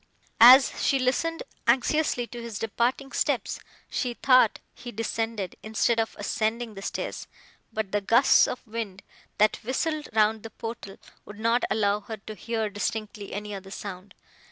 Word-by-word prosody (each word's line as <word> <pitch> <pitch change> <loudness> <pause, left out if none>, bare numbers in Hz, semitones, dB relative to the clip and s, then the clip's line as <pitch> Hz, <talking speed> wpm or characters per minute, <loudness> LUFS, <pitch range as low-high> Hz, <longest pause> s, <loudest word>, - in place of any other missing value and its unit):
As 255 +4 +8
she 275 - +3
listened 325 - 0 0.2
anxiously 250 +1 +2
to 240 0 -9
his 230 -3 -6
departing 240 +5 -1
steps, - - -1 0.3
she 245 -2 -2
thought 255 -4 +4 0.2
he 245 - -9
descended, 225 -3 -3
instead 220 +2 +1
of 225 - -1
ascending, 225 +1 -2
the 195 - -9
stairs; - - -4 0.4
but 220 -3 -3
the 205 - 0
gusts 235 +6 +5
of 250 - -6
wind, 215 -4 -6 0.3
that 215 0 +3
whistled 300 +5 -2
round 220 0 +2
the 225 - -8
portal, 225 -4 -7 0.3
would 205 +1 -12
not 230 +2 +2
allow 205 -1 +1
her 220 +1 -7
to 215 +1 -9
hear 220 +2 -2
distinctly 205 0 -4
any 210 +1 -5
other 195 -1 -8
sound. 195 -1 -8
225 Hz, 155 wpm, -26 LUFS, 210-240 Hz, 0.4 s, As